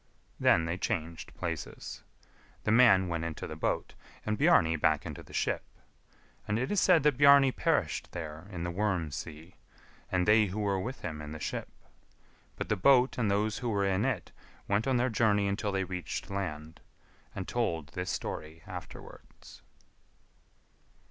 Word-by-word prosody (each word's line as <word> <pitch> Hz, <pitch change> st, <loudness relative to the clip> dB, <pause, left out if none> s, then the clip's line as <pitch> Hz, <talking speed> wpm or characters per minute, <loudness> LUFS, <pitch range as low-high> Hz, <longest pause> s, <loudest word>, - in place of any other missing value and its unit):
Then 80 Hz, -, +4 dB
they 85 Hz, +3 st, -3 dB
changed 80 Hz, -1 st, -3 dB
places. 85 Hz, -2 st, -5 dB, 0.6 s
The 110 Hz, -, +1 dB
man 110 Hz, -6 st, +6 dB
went 85 Hz, -1 st, -2 dB
into 85 Hz, -1 st, -4 dB
the -, -, -6 dB
boat, -, -, -2 dB, 0.3 s
and 110 Hz, -, 0 dB
Bjarni 105 Hz, -, +4 dB
back 80 Hz, -1 st, +1 dB
into -, -, -6 dB
the -, -, -15 dB
ship; -, -, 0 dB, 0.9 s
and 105 Hz, -, 0 dB
it 130 Hz, +3 st, -1 dB
is 205 Hz, -, +2 dB
said 175 Hz, -6 st, +5 dB
that 145 Hz, -3 st, +2 dB
Bjarni 140 Hz, -2 st, +7 dB
perished -, -, 0 dB
there 80 Hz, 0 st, -7 dB
in 85 Hz, -3 st, -5 dB
the 85 Hz, -, -2 dB
Worm 90 Hz, -5 st, -1 dB
sea, 80 Hz, +4 st, -8 dB, 0.5 s
and 90 Hz, 0 st, +1 dB
they 105 Hz, 0 st, +5 dB
who 100 Hz, +3 st, -4 dB
were 100 Hz, -2 st, 0 dB
with 125 Hz, +8 st, -5 dB
him 80 Hz, -3 st, -5 dB
in 75 Hz, 0 st, -7 dB
the 80 Hz, -, -7 dB
ship; -, -, -4 dB, 0.9 s
but -, -, -4 dB
the -, -, +1 dB
boat 125 Hz, +5 st, +4 dB
and 110 Hz, -4 st, +1 dB
those 105 Hz, +1 st, 0 dB
who 120 Hz, -, -2 dB
were 100 Hz, -2 st, +1 dB
in 95 Hz, +1 st, +1 dB
it 125 Hz, -7 st, -2 dB, 0.4 s
went 100 Hz, +5 st, +1 dB
on 130 Hz, -2 st, +2 dB
their 125 Hz, +2 st, +2 dB
journey 105 Hz, -3 st, +2 dB
until 100 Hz, +1 st, -1 dB
they 95 Hz, -1 st, 0 dB
reached 90 Hz, 0 st, -5 dB
land, 80 Hz, -5 st, -5 dB, 0.5 s
and 95 Hz, -, -5 dB
told 85 Hz, -11 st, -1 dB
this 90 Hz, 0 st, -4 dB
story 80 Hz, +1 st, -5 dB
afterwards. 90 Hz, -1 st, -11 dB
95 Hz, 170 wpm, -30 LUFS, 85-110 Hz, 0.9 s, Bjarni